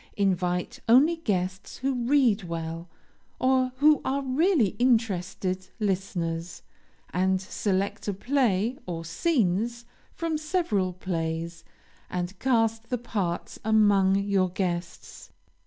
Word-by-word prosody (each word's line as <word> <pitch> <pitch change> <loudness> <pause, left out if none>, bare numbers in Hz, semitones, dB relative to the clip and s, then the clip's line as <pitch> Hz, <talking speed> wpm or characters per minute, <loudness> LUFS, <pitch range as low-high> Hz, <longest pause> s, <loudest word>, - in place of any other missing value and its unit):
Invite 180 -3 0
only 290 +8 +6
guests 190 - -2
who 270 +1 -1
read 245 -5 +2
well, 165 0 -5 0.5
or 255 0 +2
who 295 +2 +4
are 275 +1 -1
really 275 - +3
interested 190 -6 0
listeners, 180 -4 -2 0.5
and 190 +1 +1
select 195 +2 -2
a 205 - 0
play, 240 -1 +1
or 165 -2 -4
scenes 235 - 0 0.3
from 325 -2 -2
several 305 - 0
plays, 170 -2 -3 0.5
and 180 +1 -4
cast 225 -3 +1
the 250 - 0
parts 200 -7 -3
among 205 -3 +4
your 200 -2 +1
guests. 175 -2 -4
200 Hz, 105 wpm, -27 LUFS, 180-250 Hz, 0.5 s, only